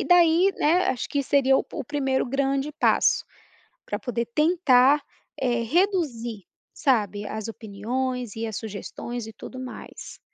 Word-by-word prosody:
E - - -4
daí, 355 +2 +5
né, 345 +5 +3
acho 255 - -2
que 285 - 0
seria 270 -1 +3
o - - 0
pu - - -9
o - - -5
primeiro 270 -3 0
grande 275 +2 0
passo, - - +3 0.6
pra - - -3
poder 235 -2 -3
tentar, 295 -4 +4 0.4
eh, 240 -3 +1
reduzir, 250 - 0 0.3
sabe, 210 -6 +1
as 220 +1 -5
opiniões 235 +3 -4
e 225 0 -2
as 220 -3 -5
sugestões 225 +2 -6
e 225 - -9
tudo 255 +4 -10
mais. 255 -1 -9
255 Hz, 150 wpm, -25 LUFS, 230-290 Hz, 0.6 s, daí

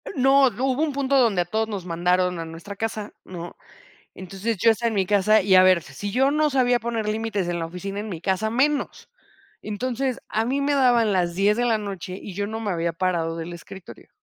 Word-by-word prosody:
No, 270 +1 +5
d 230 - -13
hubo 265 +1 +1
un 315 - 0
punto 275 0 +1
donde 225 -8 +3
a - - -2
todos 220 +5 -1
nos 200 -4 -5
mandaron 180 +1 +1
a 165 - -4
nuestra 165 +5 -9
casa, 215 0 -4
¿no? 175 -1 -8 0.6
Entonces, 195 +4 -4
yo 225 +5 +5
estaba 235 +2 -1
en 220 - -4
mi 195 -2 +1
casa 210 +2 +3
y, 190 0 +2
a 185 - +8
ver, 185 -3 +4
si 170 +9 -6
yo 265 +5 +2
no 305 +1 +2
sabía 250 -3 +2
poner 230 -2 -3
límites 215 -3 -2
en 175 0 -2
la 165 - -3
oficina, 195 +4 -6
en 215 +1 -5
mi 175 -5 -5
casa, 190 +5 -1
menos. 280 +5 -1 0.5
Entonces, 250 +4 -3
a 220 - 0
mí 265 +4 0
me 285 +1 +1
daban 240 -6 +3
las 175 -2 0
10 200 +3 +3
de 245 - +1
la 230 -2 +2
noche, 195 -3 -6
y 200 - -8
yo 200 +2 -3
no 220 +1 -5
me 210 -3 -2
había 170 -1 -1
parado 165 -2 -1
del 165 +1 -6
escritorio. 180 +2 -12
205 Hz, 230 wpm, -23 LUFS, 180-240 Hz, 0.6 s, a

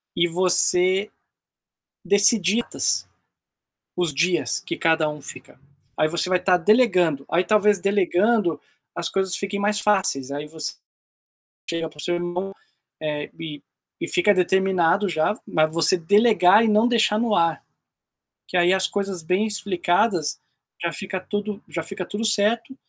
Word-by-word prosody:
e 175 0 +2
você 185 +2 +2 1.0
decidir 205 +2 +3
tas - - -1 0.9
os 175 -3 0
dias 175 +4 0
que - - -6
cada 160 -1 +1
um 150 -1 -8
fica. 130 -1 -10 0.4
Aí 155 - +2
você 170 +3 -1
vai 185 - +2
estar 180 0 +2
delegando. 175 - +2
Aí 175 +2 +2
talvez 210 -1 +2
delegando, 195 -2 +1 0.4
as 170 - -2
coisas 190 -1 0
fiquem 200 0 -3
mais 210 +1 +1
fáceis, 190 -11 0
aí 145 +1 -5
você 155 -1 -5 1.0
chega 165 -1 -3
para 150 - -20
o - - -6
seu 175 - -1
irmão, 175 +2 -4 0.5
eh, 150 -1 -4
e 155 -3 -8 0.4
e - - -2
fica 195 +3 +3
determinado 190 0 +1
já, 160 +6 0
mas 155 0 +1
você 165 +2 +2
delegar 205 +2 +4
e 225 - +2
não 215 +3 +3
deixar 220 -3 +2
no 230 -2 0
ar, 165 -2 +1 0.9
que 185 - -4
aí 175 +1 +4
as 190 0 +3
coisas 195 -4 -4
bem 185 +6 0
explicadas, 185 -3 -1 0.4
já 170 - -1
fica 190 0 -5
tudo 205 +1 -5
já 165 - -4
fica 185 +3 -6
tudo 215 +3 -4
certo, 225 +4 +1
185 Hz, 150 wpm, -22 LUFS, 165-205 Hz, 1.0 s, delegar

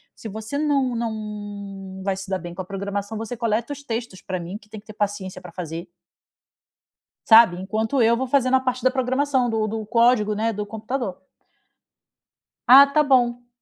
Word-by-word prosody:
se 225 - -9
você 220 +6 -5
não 280 -4 +1
não 205 -4 -6
vai 195 -1 0
se 195 0 -8
dar 190 -1 -1
bem 175 -1 -8
com 190 - -4
a 185 - -8
programação 200 +2 -4
você 225 +2 -5
coleta 230 +3 -1
os 285 0 -11
textos 230 -6 -5
pra 185 -1 -4
mim, 175 +4 -6
que 210 0 -22
tem 215 0 -8
que 205 - -21
ter 215 - -9
paciência 200 -3 -3
pra 180 -2 -11
fazer." 170 0 -6 1.4
Sabe? 225 -6 +7
Enquanto 220 +7 -1
eu 230 +1 +5
vou 260 - -2
fazendo 260 0 +2
a 260 - +5
parte 255 -1 -2
da - - +7
programação, 260 0 0
do 220 -1 0
do 220 0 -4
código, 230 -1 +3
né, 225 +2 -1
do 205 0 -4
computador. 220 -1 -4 1.5
Ah, 270 +3 +11
tá 300 +2 +2
bom! 245 -3 +2
220 Hz, 185 wpm, -23 LUFS, 200-245 Hz, 1.5 s, Ah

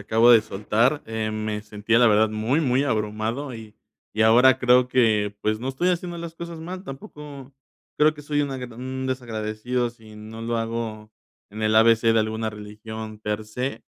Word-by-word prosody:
acabo 115 +3 +5
de 115 - +7
soltar, 110 +7 0
eh, 110 -1 -3
me 110 -1 -3
sentía 105 +2 0
la 120 - +6
verdad 110 +1 +4
muy, 110 +8 0
muy 130 -3 +2
abrumado 110 +3 -2
y 110 -2 -11 0.4
y 110 - -2
ahora 125 +4 +6
creo 125 0 +4
que, 110 -5 +2
pues, 110 0 0
no 125 +4 -4
estoy 135 +7 0
haciendo 175 -1 -2
las 170 -1 -7
cosas 170 0 -7
mal, 180 +3 -7
tampoco 140 -2 -10 0.5
creo 150 +1 +4
que 150 - -12
soy 145 0 -1
una 135 -2 -3
d 125 - -5
un 130 +2 -5
desagradecido 120 -1 -2
si 110 -2 -15
no 110 +1 -9
lo 115 0 -1
hago 115 -2 -4 0.4
en 110 +2 -7
el 110 0 +2
A-B-C 115 0 +5
de 115 - +3
alguna 110 0 -2
religión 110 +1 -8
per 105 0 -3
se, 125 +5 -4
115 Hz, 185 wpm, -24 LUFS, 110-130 Hz, 0.5 s, de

